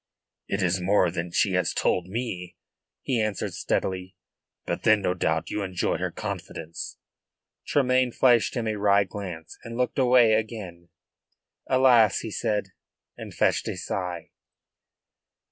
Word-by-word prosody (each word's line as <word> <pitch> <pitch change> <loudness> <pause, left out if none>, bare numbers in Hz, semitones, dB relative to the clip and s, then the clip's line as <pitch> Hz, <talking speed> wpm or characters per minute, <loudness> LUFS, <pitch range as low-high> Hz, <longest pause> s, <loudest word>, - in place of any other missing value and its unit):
"It 100 0 -1
is 90 +1 +1
more 95 -1 +3
than 85 +1 -3
she 95 +3 +2
has 90 -1 0
told 90 -1 +1
me," 95 -5 -5 0.5
he 125 -4 0
answered 110 -3 -2
steadily. 95 0 -2 0.5
"But - - -3
then, 110 -2 +4
no 90 - +1
doubt, 80 -2 -1
you 105 - -2
enjoy 95 -3 -1
her - - -2
confidence." 80 +2 -6 0.7
Tremayne 130 -2 +2
flashed 120 0 +3
him 120 -3 -1
a 110 -1 -1
wry 100 0 +4
glance 90 -4 -8
and 115 0 -7
looked 125 +1 0
away 125 -3 +5
again. 105 -6 -3 0.8
"Alas!" 125 -5 +5
he 110 - -6
said, 105 -1 -1 0.5
and - - -9
fetched - - +1
a - - -3
sigh. 90 -3 -4
100 Hz, 140 wpm, -26 LUFS, 90-115 Hz, 0.8 s, away